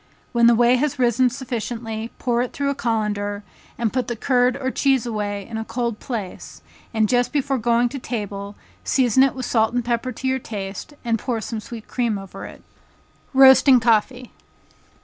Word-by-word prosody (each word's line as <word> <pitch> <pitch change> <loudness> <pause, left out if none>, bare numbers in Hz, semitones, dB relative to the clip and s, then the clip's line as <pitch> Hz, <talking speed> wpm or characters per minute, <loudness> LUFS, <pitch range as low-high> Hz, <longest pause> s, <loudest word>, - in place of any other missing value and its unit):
When 235 -1 +4
the 235 - +6
whey 240 +2 +4
has 285 +1 -1
risen 250 0 +3
sufficiently, 230 -2 -5
pour 240 -2 0
it 250 - -3
through 280 0 -1
a - - 0
colander, 210 -4 -2 0.3
and 230 -3 -1
put 255 -2 -1
the 240 - -3
curd 250 +2 +2
or 260 -1 -2
cheese 270 -4 +2
away 205 -3 -3
in 225 - -5
a 220 - -3
cold 235 -1 -3
place, 215 -8 -6 0.3
and 220 -2 +2
just 245 +2 +1
before 275 -2 0
going 235 +1 +2
to 275 +2 -6
table, 205 -4 -5 0.3
season 260 -2 +3
it 270 0 +3
with 260 -1 -4
salt 225 0 +1
and 245 -1 0
pepper 240 +1 -1
to 265 - -5
your 260 0 +1
taste, 205 +4 -7
and 230 -1 +1
pour 240 -1 -2
some 220 0 -5
sweet 220 +1 -9
cream 235 -4 -1
over 195 0 -9
it. - - -13 0.7
Roasting 265 -1 +7
Coffee. 240 +2 +1
235 Hz, 185 wpm, -22 LUFS, 220-255 Hz, 0.7 s, Roasting